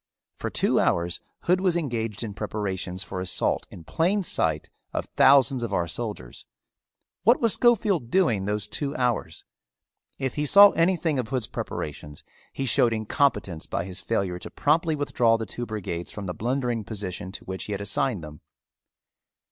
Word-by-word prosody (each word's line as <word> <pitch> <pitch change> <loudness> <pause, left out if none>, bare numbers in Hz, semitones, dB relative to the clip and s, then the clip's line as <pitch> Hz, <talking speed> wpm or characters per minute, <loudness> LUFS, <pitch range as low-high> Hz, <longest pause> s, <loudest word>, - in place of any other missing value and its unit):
For - - -4
two - - +2
hours 85 0 +1 0.2
Hood 180 +1 +2
was 180 -3 +2
engaged 115 - -3
in 105 -3 -5
preparations 95 -3 -3
for 95 -1 -6
assault 90 -1 0
in 85 - -11
plain 180 - +1
sight 80 - +1 0.3
of - - -2
thousands 135 -1 +5
of 115 -4 -3
our 90 -3 +1
soldiers. 85 - -6 0.8
What 230 +8 +4
was 230 -3 +3
Schofield 210 - +2
doing 120 - +2
those 105 0 -2
two 145 0 -3
hours? 125 -5 -1 0.7
If 135 -2 -2
he 150 0 -1
saw 200 +5 +9
anything 165 -4 +1
of 125 - -2
Hood's 130 -2 -1
preparations 75 -5 -6 0.3
he 135 - -3
showed 120 -1 +3
incompetence 110 - 0
by - - -2
his 95 +1 -5
failure 95 -5 -1
to - - -8
promptly 160 +2 +1
withdraw 120 -5 +2
the 110 - -4
two 120 +4 -6
brigades 90 -5 -4
from 105 - -7
the 90 - -3
blundering 120 0 -1
position 95 -4 -5
to - - -8
which 95 0 -5
he 105 - -4
had 100 - -3
assigned 100 0 -1
them. 75 -1 -10
115 Hz, 165 wpm, -25 LUFS, 95-145 Hz, 0.8 s, saw